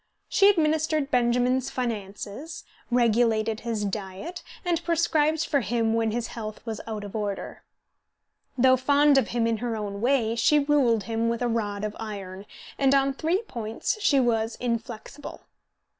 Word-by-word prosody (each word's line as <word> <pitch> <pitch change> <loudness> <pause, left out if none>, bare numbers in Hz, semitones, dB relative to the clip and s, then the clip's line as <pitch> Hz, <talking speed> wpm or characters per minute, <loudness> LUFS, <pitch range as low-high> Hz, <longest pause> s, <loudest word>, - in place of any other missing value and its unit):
She 400 -1 +5
administered 310 -4 +1
Benjamin's 250 +1 +2
finances, 220 +3 -5 0.3
regulated 225 -2 +2
his 225 -3 -3
diet, 200 - -5 0.2
and 340 -1 0
prescribed 320 -1 +1
for 285 - +1
him 225 -1 0
when 225 -1 +1
his 235 +1 -3
health 215 -2 -6
was 225 -2 -4
out 210 -3 -5
order. 205 -3 -4 1.0
Though 260 +1 +5
fond 285 +2 +4
of 250 - -1
him 235 -1 0
in 230 -1 +1
her 235 0 -3
own 200 -1 -5
way, 235 -3 +2
she 235 +6 +4
ruled 280 -7 +3
him 230 0 -1
with 235 +1 -1
a - - +1
rod 210 -3 -2
of 210 0 -3
iron, 200 -3 -7 0.3
and 275 0 +4
on 275 0 +2
three 335 - 0
points 230 - -4
she 280 -8 +4
was 230 -2 +1
inflexible. 235 +3 -5
235 Hz, 150 wpm, -26 LUFS, 220-280 Hz, 1.0 s, She